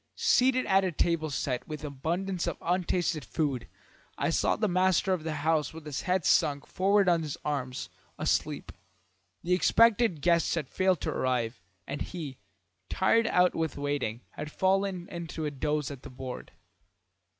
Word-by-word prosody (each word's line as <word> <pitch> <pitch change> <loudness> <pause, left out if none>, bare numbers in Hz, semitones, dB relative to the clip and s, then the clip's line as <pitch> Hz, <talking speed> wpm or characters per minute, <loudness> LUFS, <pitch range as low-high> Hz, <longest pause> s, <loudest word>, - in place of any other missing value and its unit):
Seated 255 0 +3
at 195 0 +4
a 185 - 0
table 165 -1 0
set 130 -3 -2
with 155 -1 -6
abundance 170 +6 -2
of 170 - -2
untasted 175 -2 0
food, 140 -7 -2 0.5
I - - 0
saw - - +2
the 215 - 0
master 185 0 +2
of 175 -4 -2
the 160 -1 -3
house 160 -1 +1
with 160 -1 -9
his 150 -3 -3
head 180 -2 0
sunk 145 -1 +3
forward 195 +1 +2
on 170 -2 +4
his 150 -3 -4
arms, 130 -4 -2 0.3
asleep. - - -1 0.7
The 180 - +1
expected 225 -3 +4
guests 170 -1 +3
had 155 -6 -3
failed 185 -4 +1
to - - -1
arrive, 125 -3 -1 0.2
and 145 - -5
he, 150 -7 -6 0.5
tired 225 +4 +3
out 180 -3 +4
with 160 -2 -2
waiting, 140 -5 -2
had 150 - -7
fallen 190 -1 0
into 165 -2 -5
a 150 - -1
doze 150 +1 -1
at 135 -3 -8
the - - -10
board. 130 0 -7
165 Hz, 160 wpm, -29 LUFS, 145-185 Hz, 0.7 s, at